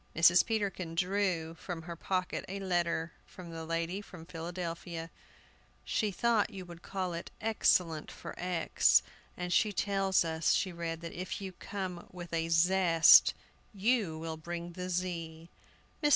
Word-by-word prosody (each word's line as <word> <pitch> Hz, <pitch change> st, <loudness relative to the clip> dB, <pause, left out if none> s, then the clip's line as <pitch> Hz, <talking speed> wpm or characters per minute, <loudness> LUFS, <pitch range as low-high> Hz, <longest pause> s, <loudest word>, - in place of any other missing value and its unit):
Mrs. 170 Hz, +2 st, +6 dB
Peterkin 195 Hz, -6 st, -2 dB
drew 180 Hz, -3 st, 0 dB
from 165 Hz, 0 st, -6 dB
her 170 Hz, 0 st, -6 dB
pocket 185 Hz, +2 st, -2 dB
a 195 Hz, +1 st, -4 dB
letter 170 Hz, -3 st, 0 dB, 0.2 s
from 175 Hz, -2 st, -10 dB
the 165 Hz, 0 st, -6 dB
lady 165 Hz, +4 st, -2 dB
from 180 Hz, -5 st, -12 dB
Philadelphia. 165 Hz, -1 st, -5 dB, 0.7 s
"She 215 Hz, -, 0 dB
thought 215 Hz, +2 st, +2 dB
you 195 Hz, -4 st, -8 dB
would 170 Hz, -1 st, -11 dB
call 185 Hz, -2 st, -3 dB
it 170 Hz, -, -5 dB
X 220 Hz, 0 st, +1 dB
cellent 165 Hz, -4 st, +2 dB
for -, -, -8 dB
X, 180 Hz, -2 st, +3 dB, 0.3 s
and 180 Hz, 0 st, -2 dB
she 215 Hz, +3 st, +3 dB
tells 195 Hz, -2 st, +2 dB
us," 160 Hz, -1 st, +1 dB
she 190 Hz, -, 0 dB
read, 165 Hz, -1 st, -4 dB
"that 170 Hz, -1 st, -6 dB
if 180 Hz, +1 st, -4 dB
you 195 Hz, -1 st, -5 dB
come 185 Hz, -2 st, -6 dB
with 175 Hz, -2 st, -9 dB
a 165 Hz, 0 st, 0 dB
zest, 165 Hz, 0 st, +6 dB, 0.4 s
you 205 Hz, -5 st, +1 dB
will 160 Hz, 0 st, -5 dB
bring 170 Hz, +2 st, -6 dB
the 180 Hz, +1 st, -5 dB
Z." 170 Hz, -2 st, -3 dB, 0.5 s
Mr. 295 Hz, -, +4 dB
175 Hz, 155 wpm, -32 LUFS, 165-190 Hz, 0.7 s, Mrs